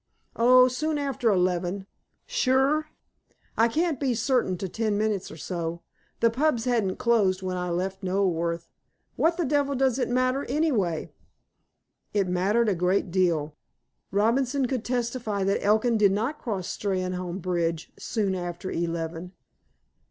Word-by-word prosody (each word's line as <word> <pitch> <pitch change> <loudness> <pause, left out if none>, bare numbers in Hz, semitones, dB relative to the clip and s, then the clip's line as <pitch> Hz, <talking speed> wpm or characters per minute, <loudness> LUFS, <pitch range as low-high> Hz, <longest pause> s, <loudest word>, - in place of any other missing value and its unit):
"Oh, 250 +2 +6
soon 295 +5 -1
after 275 -4 0
eleven." 180 0 0 0.4
"Sure." 300 - +2 0.7
"I 230 - +4
can't 315 +3 0
be 260 -4 0
certain 240 -7 +1
to 190 - -4
ten 215 +2 -1
minutes 210 -3 -1
or - - -10
so. 170 0 -4 0.4
The 230 - +4
pubs 260 -1 +1
hadn't 225 -7 +1
closed 200 -6 +2
when 185 -1 -2
I 180 0 -2
left 190 +3 -2
Knoleworth. 170 -3 0 0.5
What 335 +1 +2
the 345 - 0
devil 280 0 +1
does 265 -1 +1
it 250 - 0
matter, 255 +2 +1
anyhow?" 225 - 0 1.1
It 200 -2 +2
mattered 195 +6 +2
a - - +2
great 180 +1 0
deal. 165 -5 +1 0.5
Robinson 250 +6 +1
could 250 -2 -2
testify 235 -4 -2
that 195 +1 +1
Elkin 220 +3 +3
did 200 -2 +5
not 230 +9 -2
cross 195 -6 -3
Steynholme 185 -2 -2
bridge 170 -3 -2
"soon 205 -4 -1
after 175 0 -4
eleven." 165 +1 -3
205 Hz, 140 wpm, -26 LUFS, 180-255 Hz, 1.1 s, Oh